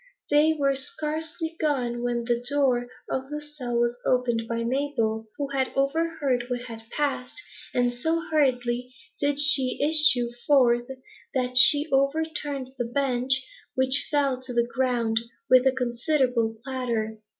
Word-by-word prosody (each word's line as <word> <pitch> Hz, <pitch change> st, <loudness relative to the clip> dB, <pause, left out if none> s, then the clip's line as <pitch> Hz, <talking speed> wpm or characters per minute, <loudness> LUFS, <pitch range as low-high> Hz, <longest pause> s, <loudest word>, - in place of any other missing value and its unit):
They 300 Hz, +2 st, +4 dB
were 275 Hz, -1 st, +1 dB
scarcely 315 Hz, +4 st, -4 dB
gone, 250 Hz, -6 st, -1 dB
when 240 Hz, -1 st, -2 dB
the 240 Hz, 0 st, -1 dB
door 260 Hz, -4 st, +1 dB, 0.2 s
of 265 Hz, +1 st, -4 dB
the 300 Hz, 0 st, -4 dB
cell 295 Hz, -5 st, -5 dB
was 240 Hz, +1 st, 0 dB
opened 240 Hz, -3 st, 0 dB
by 230 Hz, 0 st, -2 dB
Mabel, 230 Hz, -4 st, -1 dB
who 285 Hz, -1 st, -3 dB
had 265 Hz, -2 st, -1 dB
overheard 275 Hz, -3 st, 0 dB
what 245 Hz, -1 st, -2 dB
had 225 Hz, -2 st, -10 dB
passed; 280 Hz, +2 st, -3 dB, 0.3 s
and 245 Hz, 0 st, +1 dB
so 320 Hz, +7 st, -1 dB
hurriedly 250 Hz, -4 st, 0 dB, 0.2 s
did 285 Hz, 0 st, 0 dB
she 275 Hz, -3 st, +3 dB
issue 290 Hz, -6 st, +5 dB, 0.2 s
forth 245 Hz, -4 st, +3 dB, 0.5 s
that 250 Hz, -1 st, -1 dB
she 290 Hz, +4 st, +6 dB
over 275 Hz, +4 st, +2 dB
turned 285 Hz, -4 st, -5 dB
the 240 Hz, -, 0 dB
bench, 260 Hz, +1 st, -1 dB, 0.3 s
which 260 Hz, +2 st, +6 dB
fell 275 Hz, -4 st, 0 dB
to 255 Hz, -1 st, -7 dB
the 235 Hz, 0 st, +2 dB
ground 240 Hz, -3 st, 0 dB, 0.3 s
with 255 Hz, +1 st, +6 dB
a -, -, +5 dB
considerable 245 Hz, -2 st, 0 dB
clatter. 235 Hz, -5 st, -3 dB
260 Hz, 145 wpm, -25 LUFS, 240-290 Hz, 0.5 s, she